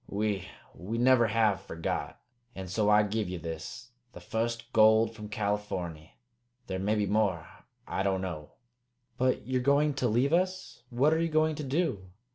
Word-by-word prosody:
We 100 -2 -2 0.2
we 105 +6 -5
never 120 -1 +5
have 110 -3 +2
forgot. 80 -3 -4 0.4
And 95 -1 -6
so 105 +3 +1
I 105 0 +6
give 105 -1 -2
ye 90 - -4
this, 80 +8 -7 0.2
the - - -9
fust 115 +1 -3
gold 110 +1 +5
from 105 -1 -8
Californy. 100 -7 -3 0.5
There 95 -4 -4
may 105 +3 +1
be 105 -1 +1
more. 105 -1 +1 0.4
I - - -2
don't 95 -1 0
know." 80 -5 -6 0.7
"But 130 0 +1
you're 130 0 0
going 140 +3 +3
to 125 - +3
leave 125 +7 +2
us? 185 -4 -1
What 135 +5 +3
are 160 - +1
you 165 - 0
going 155 0 +2
to 150 - -5
do?" 135 - -1
110 Hz, 170 wpm, -29 LUFS, 95-130 Hz, 0.7 s, I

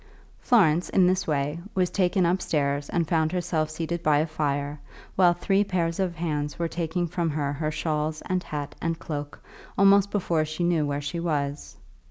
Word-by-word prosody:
Florence, 180 - +3
in 190 - +4
this 185 0 +1
way, 150 +1 -1 0.2
was 180 -2 +1
taken 185 -1 +2
upstairs 145 -5 0
and 170 -2 0
found 160 -1 +1
herself 165 -3 -1
seated 165 +2 -3
by 150 -2 +3
a 155 - +2
fire, 145 -2 -2 0.4
while 180 -2 +5
three 195 +3 +2
pairs 170 -4 -1
of 185 -3 0
hands 150 -3 -2
were 170 - -1
taking 170 +1 -2
from 170 0 -1
her 145 -2 -1
her 155 +2 -2
shawls 155 0 -2
and 185 0 0
hat 145 -4 -5
and 165 0 -1
cloak, 145 -2 -6 0.3
almost 200 0 +5
before 175 -6 0
she 155 +3 -3
knew 170 -4 +2
where 145 0 -2
she 145 +4 -4
was. 145 -4 -3
165 Hz, 180 wpm, -26 LUFS, 150-175 Hz, 0.4 s, while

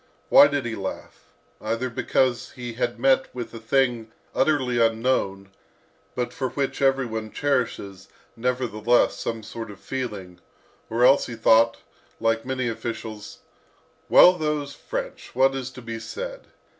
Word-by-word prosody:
Why 145 - +9
did 145 -3 -2
he 115 - -3
laugh? 95 -2 -7 0.4
Either 115 +4 -2
because 125 +1 0
he 120 -2 -6
had 120 0 -2
met 130 +1 +3
with 120 -1 -6
a 115 - -7
thing 120 -1 0 0.2
utterly 130 -5 +2
unknown, 110 -4 0 0.7
but 125 -1 -2
for 130 -2 -2
which 140 +2 -3
every 135 -1 +3
one 110 -2 -5
cherishes, 115 -9 -2 0.3
nevertheless, 120 -1 +1
some 115 -1 -4
sort 115 +1 -7
of 100 -2 -11
feeling, 105 -9 -5 0.5
or 120 +2 +3
else 135 +2 +5
he 120 - -6
thought, 115 +1 +4 0.4
like 115 +1 0
many 130 -2 -1
officials, 110 -2 -6 0.7
"Well, 180 - +8
those 150 -4 -2
French! - - -6
What 135 +1 +4
is 130 -1 -4
to 130 -1 -12
be 115 -1 -5
said? - - -7
120 Hz, 145 wpm, -24 LUFS, 115-135 Hz, 0.7 s, Why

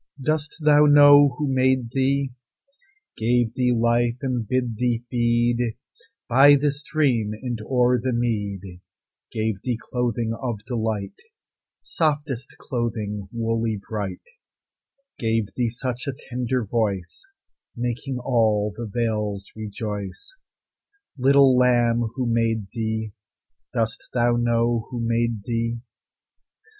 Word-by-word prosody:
Does 155 +2 -1
thou 150 -1 +5
know 145 -2 +7
who 150 - -1
made 130 -2 +2
thee, 135 +1 +1 0.9
Gave 120 0 +1
thee 125 0 +1
life, 120 0 +2
and 125 -4 -1
bid 125 -2 -1
thee 120 -1 0
feed 120 -1 +1 0.5
By 135 +4 +7
the 145 +1 +2
stream 140 -7 0
and 120 -3 -4
o'er 125 +1 +2
the 130 +1 -1
mead; 100 -6 -3 0.5
Gave 110 -3 -2
thee 125 -3 -2
clothing 120 -2 -2
of 115 -3 -5
delight, 110 -5 -2 0.7
Softest 145 -5 -1
clothing, 105 -5 -3
woolly, 115 -2 -1
bright; 105 -3 -4 1.0
Gave 110 -3 -1
thee 120 -2 0
such 125 +2 -4
a 140 - -1 0.2
tender 125 -1 -1
voice, 100 -4 -2 0.5
Making 125 +2 -3
all 110 -5 +1
the 120 -1 -5
vales 105 -3 -2
rejoice? 105 - -6 0.8
Little 135 0 +5
lamb, 120 -2 +3
who 130 - -1
made 115 -2 0
thee? 110 -2 -3 0.6
Does 115 0 -1 0.2
thou 120 0 +3
know 120 -1 +1
who 125 -2 -5
made 115 -2 0
thee? 115 +1 -2
120 Hz, 115 wpm, -23 LUFS, 110-125 Hz, 1.0 s, know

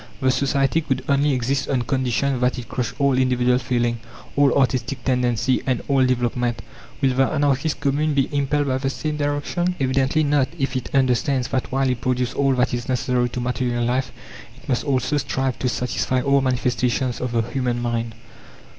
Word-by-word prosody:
The 130 -2 +2
society 135 +3 +1
could 135 -4 -2
only 140 +1 +3
exist 130 +1 -1
on 130 -3 +1
condition 130 0 0
that 125 +1 +1
it 120 -3 -6
crushed 125 +4 -4
all 140 -2 +3
individual 125 -1 +2
feeling, 120 -2 -1 0.4
all 140 -2 +4
artistic 130 -1 0
tendency, 125 -1 +1
and 125 -3 0
all 135 -2 +3
development. 120 -2 0 0.4
Will 135 -2 +3
the 135 +1 +3
anarchist 145 0 0
Commune 145 +1 +1
be 135 -2 +2
impelled 145 +1 +1
by 130 -1 0
the 135 0 -1
same 150 +2 -3
direction? 145 +5 -1
Evidently 135 +3 +1
not, 145 -2 +2
if 135 -3 -2
it 130 - -3
understands 130 -1 +1
that 130 - -2
while 135 +1 +1
it 125 -2 -1
produces 125 -1 0
all 135 -1 +2
that 125 0 +1
is 120 +1 -3
necessary 125 -1 +1
to 125 - -5
material 120 -1 -1
life, 130 +2 0 0.5
it - - -18
must 125 -3 0
also 135 0 +1
strive 135 -2 -2
to 125 - 0
satisfy 125 +1 -1
all 140 +1 +3
manifestations 125 -1 0
of 125 -1 -3
the 115 -1 +2
human 120 0 -2
mind. 115 -1 -2
130 Hz, 180 wpm, -22 LUFS, 125-140 Hz, 0.5 s, all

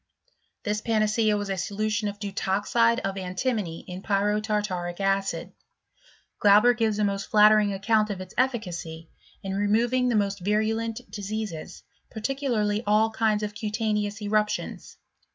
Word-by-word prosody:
This 210 0 -1
panacea 215 -1 +2
was 205 -1 -3
a 190 - -2
solution 210 +3 -1
of 205 0 -5
deutoxide 205 +3 +1
of 195 0 -3
antimony 185 -1 -2
in 180 +1 -8
pyrotartaric 205 -3 -1
acid; 195 0 -1 0.9
Glau 205 0 +8
ber 245 +2 +4
gives 225 -3 0
a 210 - +1
most 200 -1 -1
flattering 210 -1 +5
account 215 +2 +1
of 200 -2 -4
its 185 0 -9
efficacy 175 -10 -2 0.3
in 195 -1 -3
removing 230 +5 +2
the 240 - +1
most 200 -1 0
virulent 220 +3 -1
diseases, 205 -5 -5 0.3
particularly 220 -3 -1
all 215 +2 +3
kinds 220 -1 +1
of 210 0 -3
cutaneous 210 0 -2
eruptions. 210 0 -2
210 Hz, 135 wpm, -26 LUFS, 195-220 Hz, 0.9 s, Glau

